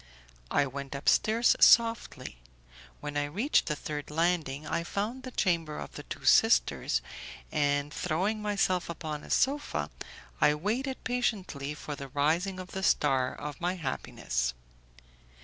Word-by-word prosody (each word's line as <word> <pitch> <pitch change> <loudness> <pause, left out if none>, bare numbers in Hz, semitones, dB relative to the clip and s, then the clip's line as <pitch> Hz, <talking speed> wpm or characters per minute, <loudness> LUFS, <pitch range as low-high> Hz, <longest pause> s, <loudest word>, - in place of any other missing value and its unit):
I 145 - +3
went 140 +1 -6
upstairs 220 +11 +3
softly: 230 - +4 0.6
when 145 0 -5
I 145 0 +1
reached 205 - +1
the 150 - 0
third 150 0 -5
landing 155 -3 0
I 170 - -1
found 210 +8 -3
the 255 - -7
chamber 170 -10 0
of - - -6
the - - -8
two - - -8
sisters, - - +4 0.5
and, 145 0 +1
throwing 190 +6 -1
myself 195 -4 0
upon 155 -3 -5
a - - -12
sofa, 270 - 0 0.5
I 150 - +5
waited 240 - -2
patiently 190 - -2
for 150 0 -6
the 140 -1 -7
rising 160 +8 0
of 185 0 -8
the 190 - -4
star 130 -8 +2
of 150 +1 -7
my 180 +2 0
happiness. 60 - -2
160 Hz, 140 wpm, -29 LUFS, 145-200 Hz, 0.6 s, I